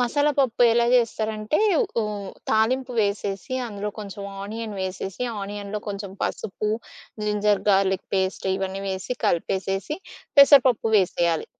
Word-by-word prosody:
మసాలాపప్పు 270 -1 +2
ఎలా 235 0 +4
జేస్తారంటే 220 0 +1 0.4
ఉ - - -1 0.5
తాలింపు 250 +4 +1
వేసేసి 200 +2 -2
అందులో 205 -2 -4
కొంచెం 200 -1 -7 0.2
ఆనియన్ 220 +1 -5
వేసేసి 190 +3 -4 0.2
ఆనియన్‌లో 205 +1 -5
కొంచెం 200 -1 -5
పసుపు, 210 +1 -2 0.5
జింజర్ 210 -1 +1
గార్‌లిక్ 190 -1 +2
పేస్ట్ 190 0 -1
ఇవన్నీ 195 0 -3
వేసి 190 +6 -3
కలిపేసేసి 195 - -1 0.4
పెసరపప్పు 270 -5 +7
వేసేయాలి. 170 -3 +1
205 Hz, 110 wpm, -24 LUFS, 195-230 Hz, 0.5 s, పెసరపప్పు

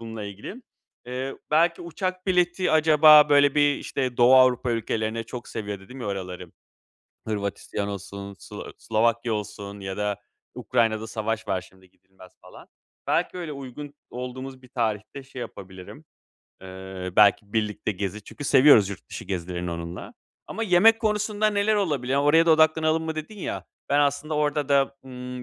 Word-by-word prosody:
bununla 110 -2 -7
ilgili. 105 - -9 0.4
Eee, 130 +2 -4
belki 165 +3 +2
uçak 185 +2 -4
bileti 180 0 +1
acaba 155 -1 +7
böyle 145 -1 +5
bir, 145 -1 +4
işte, 130 -3 -3
Doğu 125 +2 +6
Avrupa 130 -1 +4
ülkelerine 115 0 -2
çok 120 -2 -8
seviyor 105 -3 -5
dedim 125 +7 -12
ya 115 - -5
oraları. 90 -3 -6 0.7
Hırvatistan 100 -1 -3
olsun, 100 0 -7
Slo - - -10
Slovakya 115 +1 0
olsun 100 -1 -6
ya 95 0 -5
da 105 -1 -1 0.4
Ukrayna'da 110 -1 0
savaş 110 -1 -3
var, 95 -1 0
şimdi 95 0 -19
gidilmez 95 -1 -19
falan. - - -15 0.4
Belki - - 0
öyle 165 -4 -5
uygun 140 +1 -8 0.2
olduğumuz 130 +1 -7
bir 125 - -16
tarihte 115 +3 -3
şey 130 -1 -10
yapabilirim, 95 -4 -10 0.6
eee, 95 -1 -7
belki 100 0 +4
birlikte 105 -1 -1
gezi 100 +2 -5
çünkü 145 - -9
seviyoruz 130 -8 +6
yurt 100 -4 -9
dışı - - -7
gezilerini 90 -2 -4
onunla. 85 +1 -7 0.3
Ama 225 - -5
yemek 220 +3 +5
konusunda 210 -1 0
neler 205 +1 +1
olabilir? 145 - -1
Ya, 140 +1 +2
"Oraya 160 +3 +4
da - - +5
odaklanalım 160 0 +3
mı?" 160 - -3
dedin 155 +7 -7
ya. - - -4 0.2
Ben 145 +1 +3
aslında 145 +2 0
orada 150 -1 0
da, 140 -1 +2
ımm, 125 -1 -8
125 Hz, 155 wpm, -25 LUFS, 100-150 Hz, 0.7 s, acaba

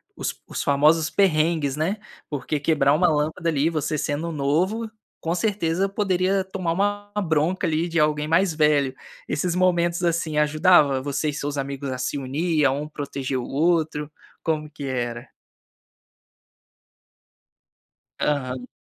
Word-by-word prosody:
os - - -3
os - - -4
famosos 155 +3 +3
perrengues, 160 -6 +2
né, 165 +8 -1 0.3
porque 145 +1 -2
quebrar 145 -1 +3
uma 175 +4 +4
lâmpada 155 +2 0
ali, 155 0 +2
você 155 -1 -1
sendo 150 +4 -2
novo, 170 +10 0 0.3
com 165 - -1
certeza, 190 -2 0
poderia 195 -1 +1
tomar 185 -3 -3
uma 205 +2 -1
bronca 165 +1 +1
ali 160 +1 0
de 165 -1 0
alguém 150 0 +1
mais 165 +2 +3
velho. 150 -4 +2 0.3
Esses 170 +4 -1
momentos, 175 -1 +2
assim, 165 -2 0
ajudava 150 -2 +4
você 145 +2 -1
e - - -3
seus 145 0 -3
amigos 140 0 -4
a 130 - -3
se 125 +3 -2
unir, 150 +4 0
a 135 - +4
um 145 +2 -3
proteger 140 -3 -4
o 125 - -3
outro? 155 -1 0 0.3
Como 155 -2 -1
que 145 -1 -9
era? 120 -1 -3 2.9
Aham. 130 -4 -1
155 Hz, 140 wpm, -24 LUFS, 145-175 Hz, 2.9 s, uma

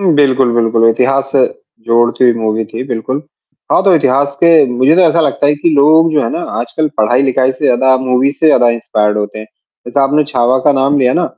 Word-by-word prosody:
हुँ, 185 -4 +1
बिल्कुल, 135 -4 +1
बिल्कुल, 115 -1 +1
इतिहास 135 +4 0
से 135 -2 +2 0.4
जोड़ती 120 +2 +1
हुई 120 - +4
मूवी 110 0 -2
थी 115 +4 -7
बिल्कुल। 130 +3 -4 0.5
हाँ - - +2
तो 195 - +4
इतिहास 140 -2 0
के 170 - +5 0.2
मुझे 130 +5 +2
तो - - +4
ऐसा 165 +2 +1
लगता 145 -1 -1
है 145 - +2
कि 150 +4 -2
लोग 160 +3 +3
जो 150 - +1
है 115 - -2
ना - - -4 0.2
आजकल 150 +6 -3
पढ़ाई-लिखाई 130 +3 +1
से 130 - -8
ज़्यादा 130 0 +2
मूवी 130 +2 0
से 160 +2 -1
ज़्यादा 125 -5 +3
इंस्पायर्ड 105 -2 -2
होते 105 +1 -5
हैं। 110 - -8 0.4
जैसा 135 +3 -1
आपने 150 +2 0
छावा 130 -2 0
का 145 - +3
नाम 140 +1 0
लिया 125 -1 +1
ना, 175 - 0
130 Hz, 215 wpm, -12 LUFS, 120-145 Hz, 0.5 s, के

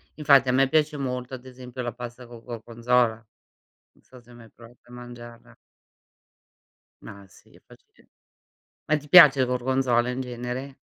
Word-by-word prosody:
infatti 140 -4 +4
a 125 - +1
me 135 0 +2
piace 155 +1 +1
molto 125 -2 -5
ad 125 -1 -8
esempio 125 0 -10
la 120 - -4
pasta 120 +1 -10
col 120 -1 -14
gorgonzola. 120 0 -1
Non 110 0 -28 0.5
so 130 - -17
se 120 0 -20
mai 115 -2 -16
provato 120 +1 -18
a - - -15
mangiarla. 120 -1 -13 1.5
Ma 100 0 -12
sì, - - -23
è - - -21
facile. - - -23 0.7
Ma 155 - +1
ti 150 0 -10
piace 150 -5 +8
il 130 - +2
gorgonzola 125 -1 0
in 125 +1 -5
genere? 125 +2 -7
125 Hz, 160 wpm, -24 LUFS, 120-130 Hz, 1.5 s, piace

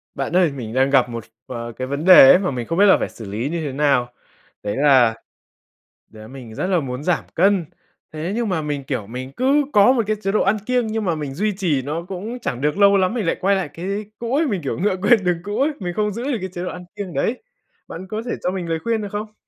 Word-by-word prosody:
Bạn 140 +5 -3
ơi, 180 -5 +4
mình 120 -5 -7
đang 130 +1 +2
gặp 130 -3 +3
một, 115 -1 -6 0.2
ờ, 120 -1 -6
cái 130 +3 -6
vấn 140 +5 -3
đề 185 -7 +10
ấy - - +7
mà 185 -5 -1
mình 120 -3 -4
không 165 - -2
biết 200 - +6
là 195 - +6
phải - - -3
xử 110 - -11
lý 115 +7 -2
như 170 +1 -3
thế 140 - -3
nào? 135 -3 +1 0.5
Đấy 105 0 -2
là 130 -5 +4 1.0
đấy 110 -1 -12
mình 125 -3 -11
rất 180 - -2
là 185 -2 +2
muốn 130 -2 -5
giảm 175 0 0
cân, 190 0 +3 0.5
thế 160 +4 -4
nhưng 235 -2 -1
mà 180 -4 -1
mình, 145 -2 -3
kiểu, 125 -7 -4
mình 130 +3 -7
cứ 280 +3 +3
có 205 +3 +6
một 245 -3 +2
cái 215 - +1
chế 195 - -1
độ 215 - +2
ăn 200 +3 +2
kiêng, 250 -1 +1
nhưng 220 -1 -2
mà 170 -3 0
mình 145 -3 -5
duy 210 +8 -1
trì 160 -9 0
nó 155 +6 -4
cũng 205 +7 -6
chẳng 125 - -4
được 150 +5 0
lâu 200 -1 +5
lắm 185 +1 +1
mình 230 -5 -2
lại 165 - +1
quay 195 +2 +3
lại 185 -6 -2
cái 195 +6 -4
cũ 235 +2 -2
ấy. 315 +2 +2
Mình, 200 -8 -2
kiểu, 140 - -3
ngựa 195 +1 +1
quen 210 0 +4
đường 180 -2 +1
cũ 205 +2 -4
ấy, 290 +3 +2
mình 175 -3 -4
không 210 +2 0
giữ 230 +4 -5
được 270 -2 -1
cái 190 - -4
chế 175 - -5
độ 180 - -3
ăn 180 0 -8
kiêng 200 -4 -6
đấy. 240 +9 -1 0.4
Bạn 185 +3 -8
có 215 +2 -3
thể 245 - -3
cho 180 - 0
mình 185 -2 -4
lời 165 0 -1
khuyên 230 -1 0
được 205 - -5
không? 210 +1 -5
180 Hz, 275 wpm, -21 LUFS, 135-205 Hz, 1.0 s, đề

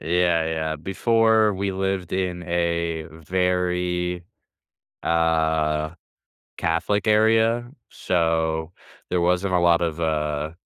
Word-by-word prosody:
Yeah, 85 -1 +1
yeah, 80 -1 -2
before, 110 +4 +2
we 100 +1 -2
lived 95 -2 -2
in 90 -2 -2
a 85 -2 -1
very, 90 +1 -1 0.8
uh 80 -1 +1 0.6
Catholic 90 +6 0
area, 115 +3 +3 0.2
so, 80 -2 -1 0.4
there 90 -1 0
wasn't 90 +2 +1
a 90 - +4
lot 85 0 +4
of, 85 -1 -2
uh, 75 -1 -1
85 Hz, 100 wpm, -23 LUFS, 80-95 Hz, 0.8 s, a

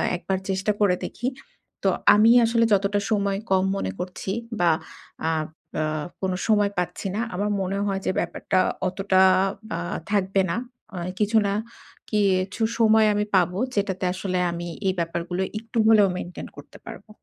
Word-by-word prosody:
একবার 190 +2 -2
চেষ্টা 190 +2 0
করে 185 -3 +4
দেখি। 240 - -4 0.6
তো - - +4 0.3
আমি 220 +2 +6
আসলে 230 0 +3
যতটা 200 +1 +2
সময় 200 -2 +1
কম 190 -1 +4
মনে 95 - -2
করছি 180 +1 -4 0.3
বা, 175 -1 +4 0.6
আপ 155 -1 -1 0.3
আ - - +1 0.4
কোন 190 -1 0 0.2
সময় 205 -2 +3
পাচ্ছি 180 +2 -2
না। 220 - 0
আমার 205 +2 -1
মনে 190 +1 -2
হয় 195 -1 -1
যে - - +2
ব্যাপারটা 185 - -1 0.3
অতটা 190 0 +2 0.5
বা 170 - -3 0.3
থাকবে 195 -1 +2
না। - - -1 0.4
আ - - -5 0.2
কিছু 215 +1 +2
না 200 - 0 0.6
কিছু 200 0 +1 0.2
সময় 220 -1 +5
আমি 210 0 0
পাবো, 180 +1 +2 0.2
যেটাতে 195 -2 -1
আসলে 185 -1 -2
আমি 170 0 -5 0.2
এই 190 - +2
ব্যাপারগুলো 170 +2 -2 0.2
একটু 225 +1 -8
হলেও 215 -3 +6
মেইনটেইন 175 0 -7
করতে - - -12
পারবো। - - -10
195 Hz, 155 wpm, -24 LUFS, 185-210 Hz, 0.6 s, আমি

